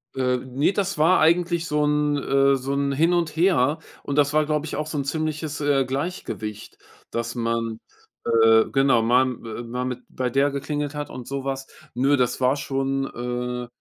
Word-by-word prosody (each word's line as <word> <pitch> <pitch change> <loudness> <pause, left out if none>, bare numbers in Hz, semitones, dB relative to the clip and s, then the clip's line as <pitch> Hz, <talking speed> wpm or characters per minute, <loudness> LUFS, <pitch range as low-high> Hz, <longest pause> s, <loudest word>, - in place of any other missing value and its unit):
Äh, 125 -1 +1
ne, 130 +6 0
das 195 -2 -1
war 165 +5 +4
eigentlich 170 +1 +2
so 150 -1 +1
'n, 150 0 +1
äh 140 0 +3
so 135 +1 -3
'n 140 0 0
Hin 165 +5 +3
und 170 -3 0
Her. 160 -4 +3 0.2
Und 140 - -3
das 145 0 +3
war, 155 0 +3
glaube 150 0 -1
ich, 160 - -5
auch 150 +1 -3
so 155 - -4
'n 140 - 0
ziemliches, 155 0 -3
äh, 140 -2 +2
Gleichgewicht, 130 - -5 0.3
dass 115 +1 -3
man, 115 -1 -2 0.5
äh 115 -1 +5
genau, 135 -3 +3
mal 120 +3 +4
m 130 -3 -4
äh, 115 +1 -6
mal 125 +2 -4
mit 125 -1 -3
bei 130 -1 -2
der 140 +3 +2
geklingelt 145 +1 -3
hat 145 0 -4
und 125 -2 -8
so 140 -1 -4
was. 135 0 -4 0.3
Nö, 135 +4 +3
das 125 -1 0
war 130 +2 +3
schon, 135 -1 -1
äh, 125 -1 -4
135 Hz, 195 wpm, -24 LUFS, 125-150 Hz, 0.5 s, äh